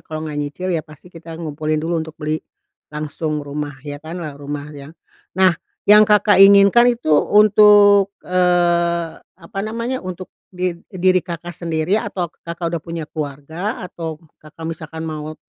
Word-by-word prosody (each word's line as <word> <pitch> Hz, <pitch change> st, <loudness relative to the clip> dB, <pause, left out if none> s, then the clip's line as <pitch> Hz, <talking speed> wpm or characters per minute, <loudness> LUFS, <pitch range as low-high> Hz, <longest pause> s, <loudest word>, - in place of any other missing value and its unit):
kalau 155 Hz, 0 st, -7 dB
enggak 150 Hz, -1 st, -5 dB
nyicil 145 Hz, +6 st, -4 dB
ya 165 Hz, -, 0 dB
pasti 155 Hz, +4 st, -17 dB
kita 165 Hz, -1 st, -10 dB
ngumpulin 155 Hz, -1 st, -3 dB
dulu 165 Hz, +2 st, -1 dB
untuk 160 Hz, -1 st, -8 dB
beli, 155 Hz, +1 st, -3 dB, 0.5 s
langsung 150 Hz, 0 st, -4 dB
rumah 145 Hz, 0 st, -5 dB
ya 145 Hz, 0 st, -7 dB
kan 160 Hz, +3 st, -8 dB
lah 145 Hz, -1 st, -8 dB
rumah 145 Hz, +1 st, -6 dB
ya. 140 Hz, -1 st, -10 dB, 0.5 s
Nah, 185 Hz, -1 st, +5 dB, 0.3 s
yang 210 Hz, +1 st, +7 dB
Kakak, 210 Hz, -1 st, +4 dB
inginkan 200 Hz, +4 st, +7 dB
itu 155 Hz, -9 st, -1 dB
untuk, 205 Hz, +2 st, +6 dB, 0.2 s
eee, 175 Hz, -2 st, +1 dB
apa 170 Hz, +3 st, -12 dB
namanya 230 Hz, +5 st, -3 dB
untuk 185 Hz, 0 st, -8 dB, 0.2 s
di 180 Hz, -1 st, -2 dB, 0.2 s
diri 185 Hz, 0 st, +2 dB
Kakak, 175 Hz, 0 st, -7 dB
sendiri 165 Hz, +5 st, -1 dB
atau 175 Hz, -5 st, -4 dB
Kakak, 170 Hz, 0 st, -5 dB
udah 170 Hz, -, -2 dB
punya 165 Hz, -1 st, -6 dB
keluarga? 155 Hz, +7 st, -5 dB
Atau 165 Hz, -3 st, -6 dB, 0.2 s
Kakak, 155 Hz, +1 st, -12 dB
misalkan 160 Hz, 0 st, -6 dB
mau, 155 Hz, -1 st, -6 dB
165 Hz, 155 wpm, -19 LUFS, 155-185 Hz, 0.5 s, yang